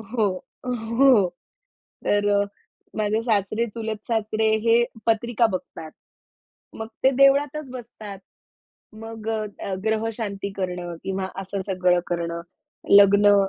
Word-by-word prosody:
हो, 220 -4 +2 0.7
हो. 250 -9 +6 0.8
तर 205 0 +2
अ, - - 0 0.5
माझे 215 +1 +1
सासरे, 215 0 0
चुलत 220 -2 -5
सासरे 220 -1 +1 0.2
हे 235 +1 +5 0.2
पत्रिका 230 +1 +2
बघतात. 165 -3 -6 0.8
मग 220 0 -6 0.2
ते 265 - +7
देवळातच 280 +1 +3
बसतात. 225 -5 -9 0.8
मग 225 0 -8
अ, 220 -1 -1 0.2
अ, 195 - -3
ग्रहशांती 220 -2 -2
करणं 180 -2 -3
किंवा 190 0 -2
असं 195 +1 -4
सगळं 180 -2 +2
करणं, 170 -1 -2 0.5
लग्न 205 0 +7
215 Hz, 110 wpm, -24 LUFS, 195-230 Hz, 0.8 s, ते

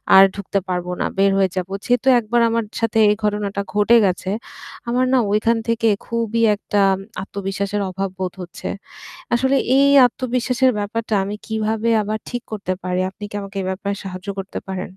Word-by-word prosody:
আর 190 - +10
ঢুকতে 200 0 -2
পারবো 180 -1 -2
না - - +1
বের 195 0 +4
হয়ে 190 -1 +3
যাবো। 185 +1 -3
যেহেতু 245 +2 +1
একবার 235 +1 +1
আমার 230 0 0 0.2
সাথে 225 -1 0
এই 210 - +3
ঘটনাটা 205 -1 -1
ঘটে 210 +3 +4
গেছে 185 0 -1 0.6
আমার 250 +2 +2
না - - +5
ওইখান 225 +2 +2
থেকে 230 0 +1 0.2
খুবই 230 -1 -1
একটা 205 0 -2 0.4
আত্মবিশ্বাসের 200 +1 -3
অভাব 195 +1 -3
বোধ 185 -1 -2
হচ্ছে। 175 - -8 0.7
আসলে 265 +3 +2 0.2
এই 280 +1 +5 0.2
আত্মবিশ্বাসের 250 +1 0
ব্যাপারটা 220 +2 -2
আমি 205 +1 -4
কীভাবে 220 0 -1
আবার 215 +1 -2
ঠিক 245 0 -4
করতে 195 -3 -3
পারি? 180 0 -1
আপনি 205 +2 -10
কি - - -13
আমাকে 195 0 -10
এ - - -5
ব্যাপারে 200 +1 -3
সাহায্য 185 0 -7
করতে 195 0 -5
পারেন? 190 -1 -4
210 Hz, 170 wpm, -20 LUFS, 195-230 Hz, 0.7 s, আর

